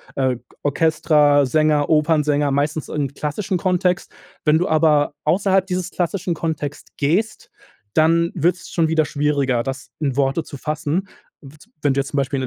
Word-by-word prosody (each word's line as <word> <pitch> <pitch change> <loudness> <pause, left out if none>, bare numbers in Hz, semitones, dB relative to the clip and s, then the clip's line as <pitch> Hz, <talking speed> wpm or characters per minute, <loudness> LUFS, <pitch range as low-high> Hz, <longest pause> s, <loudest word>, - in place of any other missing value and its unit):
äh, 130 -2 0 0.3
Orchestra, 145 -1 +3
Sänger, 150 +1 +2
Opernsänger 150 -2 +2
meistens 145 +2 -1
im 145 -3 -2
klassischen 180 +7 -2
Kontext. 180 0 0 0.3
Wenn 150 0 +4
du 175 - 0
aber 150 -2 +3
außerhalb 190 +3 +2
dieses 185 0 -3
klassischen 175 0 -2
Kontext 155 -3 -4
gehst, 195 +10 -1 0.4
dann 165 +2 +3
wird's 175 +1 -1
schon 165 -2 +1
wieder 160 -1 +2
schwieriger, 140 -4 0
das 135 +1 -6
in 140 -4 -1
Worte 140 +3 +1
zu 140 - -9
fassen. 155 +6 -2 0.3
Wid 145 +2 -15 0.2
Wenn 145 -2 +3
du 140 - 0
jetzt 135 - -1
zum 145 - -4
Beispiel 140 0 0
in - - -2
150 Hz, 160 wpm, -20 LUFS, 145-170 Hz, 0.4 s, Wenn